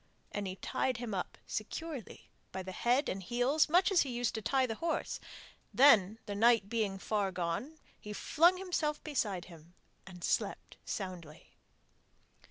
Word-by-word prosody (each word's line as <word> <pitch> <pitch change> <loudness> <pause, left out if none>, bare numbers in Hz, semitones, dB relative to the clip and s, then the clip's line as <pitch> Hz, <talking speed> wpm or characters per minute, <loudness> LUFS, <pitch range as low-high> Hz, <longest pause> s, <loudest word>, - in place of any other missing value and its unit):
And 205 -1 -3
he 185 - -4
tied 255 +5 -1
him 230 -3 -5
up 185 - -3
securely 270 - -6 0.2
by 190 0 -5
the 185 - -6
head 245 +9 +2
and 195 - -3
heels, 245 - +2
much 360 +5 +4
as 365 - +5
he 275 - -1
used 240 -1 -1
to 220 - -3
tie 265 +4 +2
the 230 - -2
horse; 330 -1 -1 0.5
then, 225 -7 +6
the 205 - -4
night 225 -1 +4
being 215 -4 -1
far 200 0 -1
gone, 180 - -3 0.2
he 210 - -8
flung 340 - +3
himself 340 -5 -2
beside 210 - -1
him 170 0 -15 0.3
and 180 -2 -10
slept - - -1
soundly. 180 -6 -6
225 Hz, 160 wpm, -33 LUFS, 190-280 Hz, 0.5 s, then